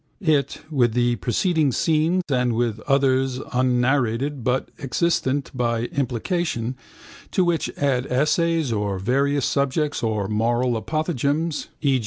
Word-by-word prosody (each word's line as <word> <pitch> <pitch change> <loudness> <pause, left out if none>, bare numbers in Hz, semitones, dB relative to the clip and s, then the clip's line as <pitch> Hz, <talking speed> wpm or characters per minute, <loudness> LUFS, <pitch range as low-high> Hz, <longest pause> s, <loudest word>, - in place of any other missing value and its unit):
It, 145 -5 +1
with 120 -6 +2
the 120 0 +1
preceding 160 - +1
scene 160 +7 +1
and 125 -3 +1
with 115 -2 -1
others 135 -2 +2
unnarrated 125 +1 +1
but 125 +2 0
existent 140 -1 0
by 115 -1 0
implication, 130 - -2 0.5
to 185 - +2
which 170 -2 0
add 135 -3 0
essays 150 +1 +1
on 100 -2 -1
various 140 +6 +1
subjects 140 +2 0
or 110 -3 -1
moral 120 +4 +1
apothegms 155 +3 -1 0.2
(e. 135 -3 +3
130 Hz, 120 wpm, -23 LUFS, 120-150 Hz, 0.5 s, e